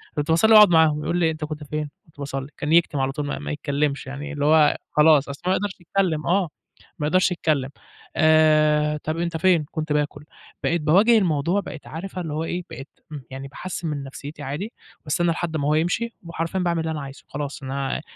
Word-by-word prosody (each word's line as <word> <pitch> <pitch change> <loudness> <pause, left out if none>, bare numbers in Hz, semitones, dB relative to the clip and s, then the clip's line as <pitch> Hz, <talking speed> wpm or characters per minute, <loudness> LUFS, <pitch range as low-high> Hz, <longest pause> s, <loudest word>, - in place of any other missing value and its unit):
كُنت 150 +1 -2
باصلّي 220 +7 +5
وأقعد 210 -3 +9
معاهم، 160 -2 +4
يقول 175 - -1
لي 175 - +2
إيه، 160 - +2
"أنت 155 -1 -5
كنت 150 -1 -6
فين؟" 150 0 -4 0.2
"كُنت 155 - -26
باصَلّي." 135 -1 -4
كان 150 +1 -3
يكتم 165 -4 +3
على 135 0 0
طول، 145 +1 -4
ما 145 - -3
ما - - -5
يتكلمش، 145 -1 -2
يعني 145 +3 -6
اللي 145 -1 -2
هو 155 -1 +5
خلاص، 150 -2 +5
أصل 140 +1 -7
هو 185 - +2
ما - - +3
يقدرش 200 -2 -4
يتكلم، 175 -4 -1
آه، 180 -2 +2 0.5
ما 150 - 0
أقدرش 185 +3 +3
أتكلم 150 -6 0 0.5
آآ، 155 -1 +4
"طب 155 +1 -2
أنت 170 -1 -2
فين؟" 170 -2 +3
"كنت 155 -2 -2
باكل." 150 0 -2 0.4
بقيت 170 -1 +1
باواجه 200 +10 +5
الموضوع، 175 0 +1
بقيت 160 -5 -9
عارفة 185 +3 -6
اللي 160 -4 -5
هو 155 +2 -2
إيه، 175 +2 -3
بقيت 135 +4 -9 0.2
م 150 - -5
يعني 135 +1 -7
باحسّن 170 +4 -6
من 145 -2 -3
نفسيتي 145 +2 -9
عادي، 150 - -5 0.3
باستنى 170 +3 +1
لحد 165 -1 -2
ما 145 -1 -1
هو 150 - +3
يمشي 180 +9 0
وحرفيًا 165 +2 -3
باعمل 170 -2 0
اللي 160 0 -2
أنا 150 -2 -4
عايزه، 135 0 -10
خلاص، 145 0 -6
أنا 135 +2 -3
155 Hz, 215 wpm, -23 LUFS, 145-170 Hz, 0.5 s, وأقعد